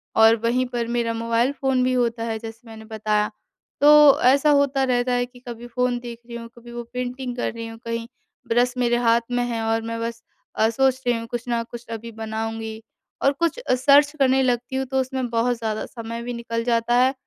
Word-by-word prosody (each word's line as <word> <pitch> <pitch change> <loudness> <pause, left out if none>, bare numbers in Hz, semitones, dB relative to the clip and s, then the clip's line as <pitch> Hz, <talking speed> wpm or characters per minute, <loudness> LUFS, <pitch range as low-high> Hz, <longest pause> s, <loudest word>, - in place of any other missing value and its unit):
और 225 0 +7
वहीं 250 +2 +2
पर 235 -1 -1
मेरा 230 -1 0
मोबाइल 230 +3 +1
फ़ोन 265 -2 0
भी 255 0 +1
होता 235 -2 0
है, 225 -1 -2
जैसे 225 +1 -10
मैंने 220 0 -11
बताया। 215 -1 -1 0.5
तो 295 -1 +8
ऐसा 275 +4 +5
होता 280 -1 +3
रहता 250 -1 +1
है 245 0 +1
कि 245 0 -17
कभी 240 0 -7
फ़ोन 250 +1 0
देख 235 -1 -8
रही 235 - -8
हूँ, 230 - -8
कभी 240 0 -12
वो 240 0 -5
पेंटिंग 250 0 -4
कर - - -2
रही 230 0 -6
हूँ 225 - -9
कहीं 230 0 -3 0.4
ब्रश 245 +2 +2
मेरे 240 -1 +2
हाथ 235 -1 +3
में 245 0 +1
है 230 -2 -2
और 225 0 +1
मैं 230 0 -4
बस 230 0 -4 0.3
अ, 220 - +3
सोच 260 +2 +1
रही 240 -1 +3
हूँ 230 - -6
कुछ 240 0 -4
न 235 -1 0
कुछ 240 0 -8
अभी 230 +1 -6
बनाऊँगी 220 0 -5 0.4
और 275 - +5
कुछ 335 - -1
अ, - - +1
सर्च 285 +3 +5
करने 265 -1 +4
लगती 245 +1 -1
हूँ। 265 0 0
तो 265 - +2
उसमें 260 -1 -3
बहुत 235 +1 +1
ज़्यादा 220 -2 -3
समय 230 -1 -7
भी 245 - -4
निकल 230 -1 -3
जाता 235 0 +1
है 260 +1 +3
240 Hz, 220 wpm, -23 LUFS, 230-255 Hz, 0.5 s, तो